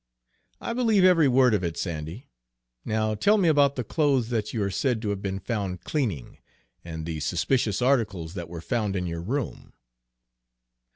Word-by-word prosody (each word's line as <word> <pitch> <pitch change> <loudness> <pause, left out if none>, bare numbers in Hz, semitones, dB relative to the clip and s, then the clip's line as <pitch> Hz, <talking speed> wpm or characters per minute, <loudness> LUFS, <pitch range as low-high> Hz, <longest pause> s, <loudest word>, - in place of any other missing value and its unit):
"I 235 - -4
believe 225 -5 +3
every 175 -5 +6
word 130 -2 +4
of 100 -3 +1
it, 85 -2 -3
Sandy; 85 - -5 0.6
now 110 0 0
tell 205 - +3
me 190 -4 +3
about 145 -3 +4
the 125 - -2
clothes 135 -2 +1
that 110 -3 -1
you 110 -4 -1
are 100 - -1
said 120 +4 0
to 105 - -1
have 100 -1 -4
been 95 -1 -3
found 95 -2 -3
cleaning, 110 - -3 0.4
and 80 -2 -6
the 80 -2 -4
suspicious 105 - 0
articles 105 -11 +1
that 85 -4 -6
were 85 -1 -7
found 105 -1 -1
in 90 -1 -1
your 85 -1 -4
room?" 125 +8 -4
110 Hz, 175 wpm, -26 LUFS, 90-135 Hz, 0.6 s, every